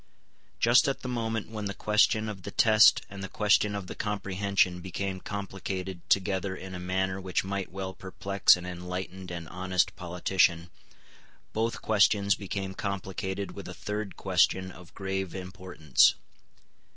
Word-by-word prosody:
Just 120 +4 +5
at 135 - -1
the - - -5
moment 115 -3 -2
when 105 -2 -5
the 100 -1 -3
question 110 +1 +3
of 105 -3 -6
the - - -6
Test 110 -4 +5
and 100 0 -8
the 95 - -5
question 105 0 +2
of 100 -2 -4
the - - -6
Comprehension 100 -3 0
became 95 +1 -4
complicated 95 -2 -5
together 95 0 +1
in 95 0 -8
a 90 - -5
manner 95 +1 -1
which 95 -1 -1
might 100 0 -3
well 95 0 -5
perplex 95 0 +3
an 90 - -8
enlightened 90 +1 -6
and 85 -2 -6
honest 95 0 0
politician, 90 -1 +1 0.8
both 115 +1 -1
questions 100 -1 +4
became 95 -1 -4
complicated 95 0 -4
with - - -9
a - - -7
third 105 -1 -4
question 95 0 +2
of 90 -1 -14
grave 95 -1 -3
importance. 90 -6 +2
95 Hz, 150 wpm, -28 LUFS, 90-100 Hz, 0.8 s, Just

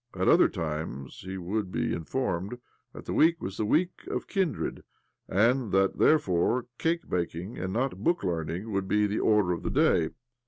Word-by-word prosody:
At - - 0
other - - +6
times 75 -4 -5
he 95 +1 -6
would 95 +2 -3
be - - -1
informed 95 +3 -2 0.3
that - - -11
that - - -3
week 165 +1 +4
was 95 - -5
thte 110 - 0
Week 175 +9 0
of - - -3
Kindred,! 190 -5 -2 0.5
and 115 +3 +2
that 95 0 +2
therefore 120 - +3
cake 170 +1 0
baking, 90 +3 -3
and 95 +1 -3
not 115 -2 -2
book 175 +6 +1
learning, 85 +4 -3
would 95 -1 -1
be 105 +1 +3
the 105 +1 -1
order 105 -4 +3
of 85 - -2
the - - -2
day. 80 -2 +3
100 Hz, 180 wpm, -28 LUFS, 90-125 Hz, 0.5 s, other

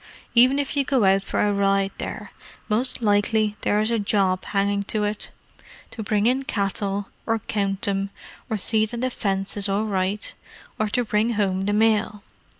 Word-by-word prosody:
Even 255 +3 +6
if 285 0 -2
you 280 - +2
go 265 -4 +1
out 195 0 +4
for - - -3
a 205 0 +2
ride 195 0 +2
there, - - -5 0.4
most 240 +3 0
likely 210 0 +2
there 205 - +2
is 215 +2 +1
a 230 - +1
job 195 -3 +1
hanging 200 0 0
to 210 +1 -1
it—to 210 +2 -7
bring 210 -1 0
in 255 +3 +3
cattle, 200 -4 -2 0.2
or 225 0 +2
count 200 -2 -2
them, 195 0 -1 0.4
or 220 - 0
see 215 +2 +2
that 235 +2 -5
a 255 - 0
fence 195 -3 -2
is 205 -1 0
all 200 +2 +1
right, 195 0 -1 0.5
or 215 - +1
to 240 +3 0
bring 215 +2 +1
home 195 -3 0
the 205 - 0
mail. 215 -1 +2
210 Hz, 180 wpm, -24 LUFS, 195-220 Hz, 0.5 s, Even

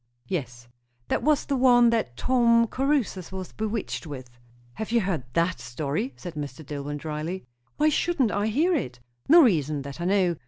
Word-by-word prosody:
"Yes." 125 -9 -5 0.4
"That - - +1
was 300 -1 +2
the 280 - -1
one 245 -2 +5
that 220 - -1
Tom 235 -2 +4
Caruthers 255 - -1
was 190 -1 -6
bewitched 215 -5 -3
with?" 130 -4 -8 0.4
"Have 220 - -5
you 235 -1 +3
heard 180 -9 -2
that 170 +2 +1
story?" 145 - -3
said 175 -3 -7
Mr. 145 -1 -7
Dillwyn 145 0 -5
dryly. 155 +4 -5 0.3
"Why 305 +1 +4
shouldn't 295 -6 +1
I 205 +1 0
hear 310 - +2
it?" 125 - -2 0.3
"No 335 +2 +9
reason, 155 - +1
that 140 +4 -8
I - - -2
know. 185 -3 +2
190 Hz, 170 wpm, -26 LUFS, 150-240 Hz, 0.4 s, No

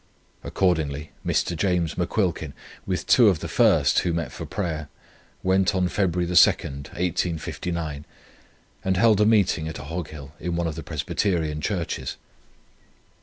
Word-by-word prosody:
Accordingly 80 -5 0
Mr. 85 - 0
James 85 -1 0
McQuilkin, - - -1 0.3
with 95 -1 -2
two 120 -3 +6
of 95 - +1
the - - -6
first - - +4
who 85 - 0
met 85 -2 -2
for - - -7
prayer, 80 -7 -3 0.5
went 95 0 +2
on 90 -1 +2
February 90 -2 0
2, 85 - -4
1859, 80 0 0 0.8
and 95 -1 +1
held 105 0 +4
a 105 - +5
meeting 95 -7 +3
at 80 - -5
Ahoghill 75 -2 -6
in 85 +1 -3
one 85 0 0
of 80 - -2
the 80 - -6
Presbyterian 80 0 -1
Churches. 90 -4 -3
85 Hz, 135 wpm, -24 LUFS, 80-95 Hz, 0.8 s, two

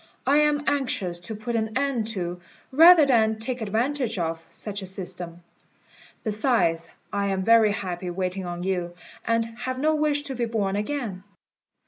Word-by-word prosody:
I 280 +2 +4
am 300 -1 +3
anxious 230 -11 -1
to 215 +6 -5
put 230 +3 -4
an 220 +1 -1
end 265 -5 0
to, 175 0 -4 0.3
rather 325 +3 +8
than 220 -5 +3
take 245 +2 -4
advantage 230 +2 -1
of, 165 -1 -2
such 205 -1 -5
a 190 - -6
system. 175 -2 -6 0.8
Besides, 205 -7 +1 0.2
I 200 0 0
am 190 -1 -1
very 225 0 +5
happy 185 -4 -4
waiting 185 +1 -3
on 175 0 -5
you, 180 -2 -2 0.3
and 230 0 +2
have 255 +1 -3
no 310 +4 +2
wish 300 -1 +1
to 275 - -3
be 245 -2 -1
born 210 -4 -1
again." 210 -4 -3
220 Hz, 160 wpm, -25 LUFS, 185-255 Hz, 0.8 s, rather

